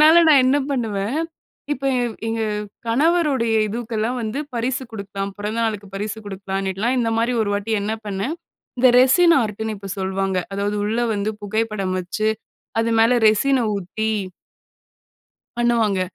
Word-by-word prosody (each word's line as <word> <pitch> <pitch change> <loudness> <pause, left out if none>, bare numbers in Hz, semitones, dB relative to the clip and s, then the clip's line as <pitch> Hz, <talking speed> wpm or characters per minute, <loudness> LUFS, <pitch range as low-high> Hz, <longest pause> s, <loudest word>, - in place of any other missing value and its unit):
அதனால 320 +3 +8
நான் 280 -4 +7
என்ன 280 +2 +4
பண்ணுவேன், 225 0 -1 0.5
இப்ப 275 0 -5
என் 240 -3 -1
எங்க 225 0 -1 0.5
கணவருடைய 275 -3 +2
இதுவுக்கெல்லாம் 230 +2 -2
வந்து 220 +5 -3 0.2
பரிசு 255 +3 -1
குடுக்கலாம். 200 -1 -5
பிறந்த 210 +3 -3
நாளுக்கு 210 -2 -2
பரிசு 210 +2 -4
குடுக்கலாம்ன்னிட்டுலாம், 195 +4 -2
இந்த 230 -1 0
மாரி 240 +2 +1
ஒரு 205 - -1
வாட்டி 205 +2 -2
என்ன 215 +2 -1
பண்னேன்? 200 +10 -2 0.5
இந்த 255 - +7
ரெசின் 335 +7 +6
ஆர்ட் 210 -1 -4
ன்னு 220 -1 -3
இப்ப 195 -1 -8
சொல்வாங்க. 190 0 -1 0.2
அதாவது 205 +1 -1
உள்ள 220 +3 -1 0.2
வந்து 205 +2 -1
புகைப்படம் 210 -3 -1
வச்சு 215 +4 -1 0.5
அது 230 0 0
மேல 230 +2 +5 0.2
ரெசின 265 +5 +3 0.2
ஊத்தி 215 +4 -2 1.5
பண்ணுவாங்க. 230 -5 +2
220 Hz, 140 wpm, -21 LUFS, 200-245 Hz, 1.5 s, அதனால